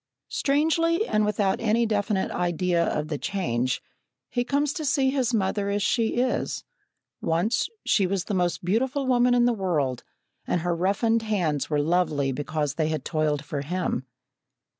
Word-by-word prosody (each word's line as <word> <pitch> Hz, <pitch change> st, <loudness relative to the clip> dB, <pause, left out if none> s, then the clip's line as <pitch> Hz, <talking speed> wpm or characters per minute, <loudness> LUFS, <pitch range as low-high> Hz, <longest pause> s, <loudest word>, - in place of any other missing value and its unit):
Strangely, 330 Hz, +6 st, +2 dB
and 215 Hz, -, +1 dB
without 205 Hz, -2 st, +1 dB
any 230 Hz, +1 st, +2 dB
definite 205 Hz, -2 st, 0 dB
idea 175 Hz, 0 st, +1 dB
of 150 Hz, -2 st, -1 dB
the 150 Hz, -2 st, -3 dB
change, 130 Hz, -11 st, -1 dB, 0.5 s
he 245 Hz, -, 0 dB
comes 285 Hz, +3 st, 0 dB
to 320 Hz, -, -4 dB
see 270 Hz, -2 st, +2 dB
his 260 Hz, -3 st, 0 dB
mother 200 Hz, -2 st, 0 dB
as 200 Hz, 0 st, 0 dB
she 225 Hz, +1 st, +1 dB
is. 250 Hz, +1 st, -1 dB, 0.6 s
Once, 175 Hz, -, +1 dB, 0.2 s
she 195 Hz, -3 st, +3 dB
was 190 Hz, -1 st, -1 dB
the 210 Hz, -, -4 dB
most 175 Hz, -2 st, 0 dB
beautiful 260 Hz, +8 st, 0 dB
woman 245 Hz, -1 st, +3 dB
in 240 Hz, 0 st, +4 dB
the 245 Hz, -, +3 dB
world, 155 Hz, -, -1 dB, 0.4 s
and 180 Hz, -, 0 dB
her 175 Hz, 0 st, 0 dB
roughened 205 Hz, +6 st, +1 dB
hands 180 Hz, -10 st, -1 dB
were 150 Hz, -1 st, +1 dB
lovely 155 Hz, -4 st, +1 dB
because 145 Hz, +1 st, -2 dB
they 155 Hz, +1 st, 0 dB
had 155 Hz, -4 st, -3 dB
toiled 150 Hz, -2 st, 0 dB
for 145 Hz, -1 st, -3 dB
him. 150 Hz, -4 st, -2 dB
195 Hz, 160 wpm, -26 LUFS, 160-240 Hz, 0.6 s, in